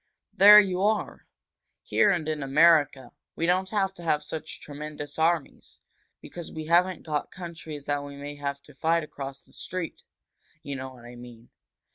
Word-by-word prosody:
"There 210 +2 +10
you 190 -3 +1
are! 210 +1 -1 0.6
Here 210 - +3
and 170 -6 0
in 155 -1 -2
America, 145 -1 +3 0.2
we 165 - -1
don't 185 +2 +1
have 195 -2 0
to 175 - -12
have 150 -2 +1
such 155 +1 -6
tremendous 150 +1 -7
armies, 165 -2 -1 0.4
because 175 -2 -9
we 155 -1 -6
haven't 175 +2 +2
got 150 -2 -2
countries 165 -5 -8
that 145 0 -1
we 140 0 -9
may 145 +1 -7
have 140 0 -4
to 145 - -17
fight 165 +4 +1
across 135 -2 -8
the - - -26
street 180 -2 -6 0.6
you 140 -1 -5
know 130 0 -6
what 120 -2 -15
I 120 +1 -11
mean. 120 -1 -13
155 Hz, 170 wpm, -27 LUFS, 140-175 Hz, 0.6 s, There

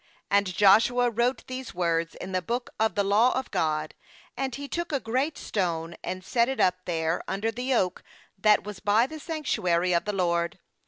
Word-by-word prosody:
26And 200 -3 +2
Joshua 235 +5 +5
wrote 240 +2 0
these 255 -4 -7
words 170 -2 0
in 190 - -7
the 185 -1 0
book 240 +5 -3
of 220 -4 +1
the 200 - +2
law 215 +6 +3
of 260 - -4
God; 155 -4 -1 0.4
and 265 -2 -2
he 285 0 -6
took 345 +3 -3
a 280 - +1
great 260 +7 -1
stone, 170 -4 -2
and 185 0 -5
set 235 +2 +2
it 265 - -3
up 180 0 +2
there 165 -1 -1
under 200 +4 -1
the 250 +3 -3
oak 185 -5 0 0.3
that 210 +2 +4
was 210 -2 -7
by 210 +4 +3
the 315 +4 -8
sanctuary 185 - 0
of 170 - +1
the 210 - -2
LORD. 170 0 0
205 Hz, 195 wpm, -27 LUFS, 180-245 Hz, 0.4 s, Joshua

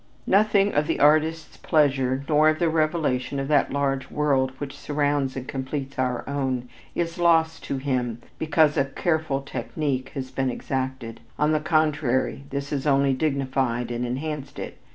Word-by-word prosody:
Nothing 200 0 +3
of 150 +1 +1
the - - -1
artist's 155 +2 +3
pleasure, 135 -4 +1
nor 155 0 +5
of 155 - +1
the 170 -1 +2
revelation 155 -5 0
of 135 - -2
that 145 -3 +3
larger 135 -2 0
world 140 -3 +2
which 140 -1 -6
surrounds 145 -2 -1
and 130 -1 -5
completes 135 0 -4
our 125 -1 -1
own, 130 -3 -2 0.3
is 170 0 -2
lost 165 -2 +3
to 135 - -2
him 125 -4 -1 0.2
because 155 -1 +3
a 135 - +3
careful 155 0 -1
technique 135 -1 -3
has 130 -2 -5
been 135 -1 0
exacted, 130 -2 -4 0.2
on 150 +1 +2
the 155 - +2
contrary 150 -4 +1
this 140 +1 -4
has 145 0 -2
only 140 -1 +3
dignified 130 -4 -1
and 120 +1 -2
enhanced 140 +3 -4
it. - - -7
140 Hz, 160 wpm, -25 LUFS, 130-155 Hz, 0.3 s, nor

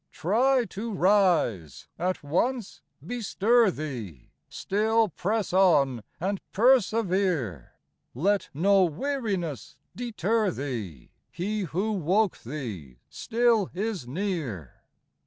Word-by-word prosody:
Try 245 - +2
to 215 +3 -6
rise; 180 - +2
at 180 -1 -1
once 210 - -1 0.2
bestir 230 +1 +2
thee, 120 - -7 0.2
Still 220 +2 +1
press 205 +3 -2
on 145 -10 +4 0.2
and 195 +3 -2
persevere, 190 - +1 0.4
Let 195 +7 +1
no 195 +6 +3
weariness 185 - -3 0.2
deter 225 -2 0
thee: 115 - -6 0.2
He 205 +5 -3
who 190 +7 -2
woke 195 +2 +1
thee 110 - -7
still 230 -4 +1
is 195 - -3
near. 140 - -4
190 Hz, 95 wpm, -27 LUFS, 145-220 Hz, 0.4 s, on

